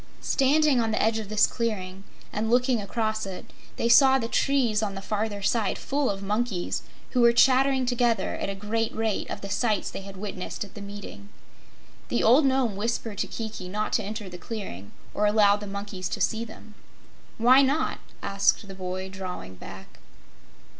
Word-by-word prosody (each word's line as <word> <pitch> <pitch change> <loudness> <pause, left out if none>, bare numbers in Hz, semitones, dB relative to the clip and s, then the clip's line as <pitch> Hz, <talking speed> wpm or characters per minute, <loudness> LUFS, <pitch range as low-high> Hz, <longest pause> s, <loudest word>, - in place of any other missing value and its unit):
Standing 280 -1 +3
on 225 - 0
the 215 - 0
edge 225 0 +2
of 210 -2 -7
this 210 -1 +5
clearing 195 -5 -3 0.3
and 220 +1 -1
looking 245 -1 +3
across 215 0 -2
it, 190 -1 -8 0.2
they - - 0
saw 265 +3 +7
the 230 -3 -2
trees 240 -4 +2
on 200 -2 -2
the - - -4
farther 205 0 -3
side 215 -1 +1
full 280 0 -1
of 195 0 -3
monkeys, 210 -2 -1 0.3
who 250 - +2
were 235 0 +7
chattering 265 +2 +4
together 240 -4 +1
at - - -3
a 195 - -3
great 220 +3 -1
rate 220 -2 -1
of - - -5
the 200 - -6
sights 215 -3 0
they - - -6
had 195 0 -10
witnessed 195 -1 -5
at 200 - -12
the 205 - -9
meeting. 200 - -9 0.8
The - - 0
old 270 +6 +6
Nome 260 -6 +1
whispered 220 0 -3
to - - 0
Kiki 220 -5 -6
not 210 +3 -2
to 220 - +2
enter 210 0 -5
the 180 -1 -9
clearing 160 - -7 0.2
or 210 - +2
allow 205 -1 +5
the 205 0 -7
monkeys 200 -2 -5
to - - -3
see 225 +1 0
them. 220 -1 -12 0.6
"Why 250 +4 +6
not?" 280 +4 +1 0.2
asked 200 +1 +1
the 195 - -8
boy, 185 0 -5
drawing 185 - -7
back. 95 +1 -12
215 Hz, 185 wpm, -26 LUFS, 195-235 Hz, 0.8 s, saw